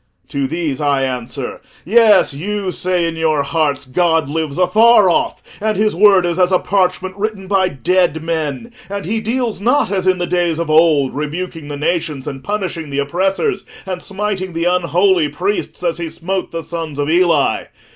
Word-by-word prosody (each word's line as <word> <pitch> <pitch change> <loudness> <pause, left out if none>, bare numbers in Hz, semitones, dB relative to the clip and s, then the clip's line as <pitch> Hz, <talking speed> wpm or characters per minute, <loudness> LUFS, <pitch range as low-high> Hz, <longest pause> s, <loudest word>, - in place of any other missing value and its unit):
To 140 -1 -1
these 155 -2 -3
I 140 -2 +1
answer: 125 0 -4 0.2
'Yes, 215 -4 +5
you 195 +5 -3
say 180 -1 0
in 165 - -4
your 155 -3 +1
hearts, 145 -1 -1
God 160 +2 +1
lives 155 -2 -2
afar 205 +2 +5
off, - - -1 0.2
and 215 -1 0
his 215 -1 +1
word 195 -1 +5
is 175 +1 -1
as 180 0 +3
a 185 - +5
parchment 185 -1 0
written 205 -1 -3
by 190 -1 +2
dead 160 +3 0
men, 160 - -3 0.2
and 200 -2 -4
he 220 +5 -1
deals 230 -2 -2
not 245 -1 +2
as 190 -2 -1
in 185 -1 +3
the 175 - -1
days 175 -2 0
of 165 -2 -2
old, 155 -4 +4
rebuking 155 +2 -5
the 145 -1 -5
nations, 150 -3 -2
and 135 -2 -6
punishing 185 -7 -3
the 140 - -4
oppressors, 190 - 0 0.2
and 185 -2 -4
smiting 195 -2 -3
the 165 +1 -2
unholy 180 -1 +2
priests 180 +5 -3
as 170 -1 -1
he 170 -1 -3
smote 185 +4 -3
the 165 -1 -5
sons 165 -3 -6
of 145 0 -1
Eli. 165 -3 +2
175 Hz, 180 wpm, -17 LUFS, 155-190 Hz, 0.2 s, Yes